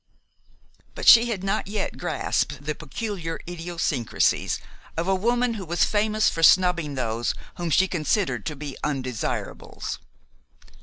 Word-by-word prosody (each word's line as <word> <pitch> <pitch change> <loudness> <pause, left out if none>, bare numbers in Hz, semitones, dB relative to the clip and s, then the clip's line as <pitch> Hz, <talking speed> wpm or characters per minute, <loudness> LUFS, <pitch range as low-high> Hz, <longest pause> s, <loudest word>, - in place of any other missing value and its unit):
But - - -5
she 235 +1 +9
had 200 -5 -3
not 195 0 -1
yet 205 0 -3
grasped 150 -4 -1
the 150 - -1
peculiar 165 +2 -5
idiosyncrasies 165 - 0 0.4
of 165 +2 -1
a 195 - +3
woman 240 +5 +1
who 200 -4 -6
was 170 +1 +1
famous 215 0 +2
for 165 - 0
snubbing 170 -3 +4
those 115 -2 -1 0.2
whom 175 -1 -2
she 190 +5 +4
considered 180 +3 0
to 155 - -3
be 145 -1 -7
"undesirables." 130 -6 -3
175 Hz, 135 wpm, -25 LUFS, 150-205 Hz, 0.4 s, she